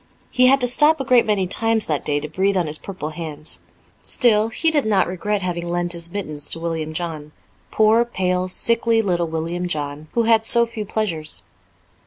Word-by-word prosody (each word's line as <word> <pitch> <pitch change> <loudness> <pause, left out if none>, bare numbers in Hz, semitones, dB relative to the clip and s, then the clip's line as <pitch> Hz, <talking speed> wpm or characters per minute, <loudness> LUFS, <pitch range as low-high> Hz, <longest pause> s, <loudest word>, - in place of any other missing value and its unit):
He 255 0 +4
had 270 +1 +5
to 245 - +2
stop 295 +5 +4
a - - -1
great 250 -3 +4
many 205 -3 +1
times 225 +3 +1
that 150 -3 -2
day 145 -1 0
to 150 - -5
breathe 190 +5 0
on 175 - +1
his 155 0 -1
purple 185 -6 -6
hands. 155 -2 -5 0.4
Still, 220 -3 +3
he 320 +8 +1
did 295 -3 +2
not 205 -4 +2
regret 195 +3 -2
having 175 -1 -3
lent 175 0 -2
his 170 0 -4
mittens 155 -7 -5
to 165 - -1
William 165 -2 -3
John 155 -2 -5 0.4
poor, 220 +2 +4
pale, 185 -5 -1
sickly 230 +3 +2
little 175 -4 0
William 165 +2 -3
John, 150 -2 -5
who 235 - +2
had 225 -1 +3
so 235 +1 +5
few 225 -2 -6
pleasures. 170 -8 -2
185 Hz, 195 wpm, -21 LUFS, 165-225 Hz, 0.4 s, had